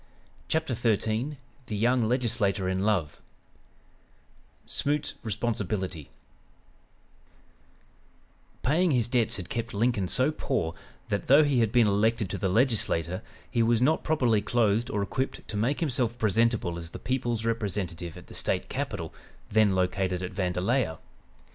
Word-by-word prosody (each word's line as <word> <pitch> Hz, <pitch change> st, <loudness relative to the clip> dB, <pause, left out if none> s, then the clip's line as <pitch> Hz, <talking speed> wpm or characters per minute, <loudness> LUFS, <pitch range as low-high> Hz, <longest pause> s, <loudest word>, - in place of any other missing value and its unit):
CHAPTER 160 Hz, -5 st, 0 dB
XIII 115 Hz, +4 st, 0 dB, 0.3 s
THE 105 Hz, -, -3 dB
YOUNG 120 Hz, +2 st, +3 dB
LEGISLATOR 115 Hz, -6 st, +1 dB
IN 95 Hz, 0 st, 0 dB
LOVE 95 Hz, -7 st, 0 dB, 1.4 s
SMOOT'S 145 Hz, +1 st, -1 dB
RESPONSIBILITY 100 Hz, -, -2 dB, 2.5 s
Paying 170 Hz, +7 st, +3 dB
his 125 Hz, -6 st, +2 dB
debts 120 Hz, -4 st, +2 dB
had 90 Hz, -2 st, -7 dB
kept 115 Hz, -2 st, -3 dB
Lincoln 105 Hz, -3 st, +1 dB
so 130 Hz, +10 st, +2 dB
poor 130 Hz, -, -2 dB, 0.4 s
that, 100 Hz, -, -2 dB
though 140 Hz, +4 st, +7 dB
he 140 Hz, -4 st, +2 dB
had 115 Hz, -3 st, +2 dB
been 120 Hz, -1 st, +5 dB
elected 105 Hz, +1 st, +1 dB
to -, -, -3 dB
the 95 Hz, -, 0 dB
Legislature, 95 Hz, -, +1 dB, 0.3 s
he 115 Hz, -, +2 dB
was 115 Hz, 0 st, +3 dB
not 140 Hz, +6 st, +2 dB
properly 125 Hz, -9 st, +2 dB
clothed 115 Hz, +1 st, +1 dB
or 105 Hz, -5 st, -1 dB
equipped 130 Hz, +6 st, -3 dB
to -, -, -5 dB
make 125 Hz, -, 0 dB
himself 125 Hz, -6 st, 0 dB
presentable 110 Hz, -5 st, +1 dB
as 85 Hz, -1 st, -7 dB
the -, -, -8 dB
people's 120 Hz, -3 st, -2 dB
representative 95 Hz, -7 st, -2 dB
at -, -, -11 dB
the -, -, -13 dB
State 90 Hz, -, -1 dB
capital, 115 Hz, -, -4 dB, 0.4 s
then 105 Hz, -2 st, +4 dB
located 95 Hz, 0 st, 0 dB
at 90 Hz, -, -4 dB
Vandalia. 90 Hz, +1 st, 0 dB
110 Hz, 135 wpm, -28 LUFS, 95-125 Hz, 2.5 s, though